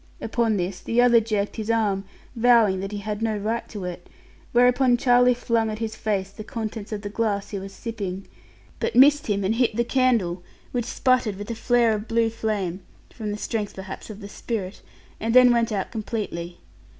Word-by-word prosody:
Upon 225 -2 0
this, 180 +1 -3
the 230 - -1
other 245 -1 +6
jerked 215 -2 -2
his 220 0 -4
arm, 205 -4 +1 0.3
vowing 230 -5 +4
that 195 +1 -4
he 210 - -4
had 210 +1 -4
no 220 -2 0
right 220 +3 -3
to 205 -4 -6
it; 175 0 -7 0.4
whereupon 245 +1 +4
Charlie 245 0 +4
flung 230 -2 0
at 215 - -4
his 220 -1 -4
face 195 -3 -2
the 215 +2 -9
contents 220 -1 -5
of 210 -1 -4
the 205 - -4
glass 205 -2 -1
he 200 - -3
was 195 +1 -8
sipping, 195 -3 -5 0.5
but - - -2
missed 285 +3 +6
him 200 -2 0
and 195 +3 +1
hit 230 -2 +1
the 235 - +2
candle, 235 -9 +1 0.3
which 240 -2 -1
sputtered 250 -4 +1
with 205 +3 -6
a - - -3
flare 235 0 +3
of 215 +1 -4
blue 230 -1 +1
flame 205 -5 -2 0.3
(from 215 -3 -5
the 205 - -3
strength 210 -1 -3
perhaps 190 +2 -8
of 215 0 -9
the 200 - -7
spirit) 205 -2 -5 0.4
and 225 +2 -1
then 250 -1 +8
went 235 -1 +1
out 200 -3 -2
completely. 205 -6 -4
220 Hz, 200 wpm, -24 LUFS, 200-235 Hz, 0.5 s, then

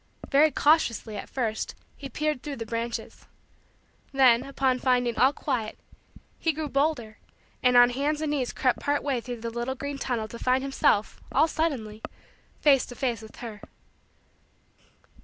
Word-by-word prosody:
Very 300 +2 +6
cautiously, 285 -9 +2
at - - -6
first, 225 -4 -2 0.2
he 275 - -8
peered 300 0 -1
through 290 -2 -5
the 230 - -5
branches. 230 +1 -5 0.8
Then, 255 -4 +5
upon 270 -2 0
finding 245 -2 +2
all 260 +2 +5
quiet, 250 -7 -3 0.6
he 325 - +1
grew 305 0 -4
bolder, 275 -6 -1 0.4
and 250 -1 +4
on 245 0 +7
hands 290 +4 -1
and 310 -1 -1
knees 265 -4 -1
crept 255 -2 +1
part 290 0 0
way 270 -4 0
through 240 -1 -7
the 230 0 -4
little 240 +3 -3
green 280 +1 -5
tunnel 230 -4 -2
to 235 - -8
find 255 +1 +2
himself, 270 -6 +1
all 315 - +4
suddenly, 255 -10 -2 0.6
face 275 -4 +4
to 245 - -9
face 240 -4 -1
with 220 0 -12
her. 215 -2 -8
255 Hz, 155 wpm, -27 LUFS, 235-285 Hz, 0.8 s, on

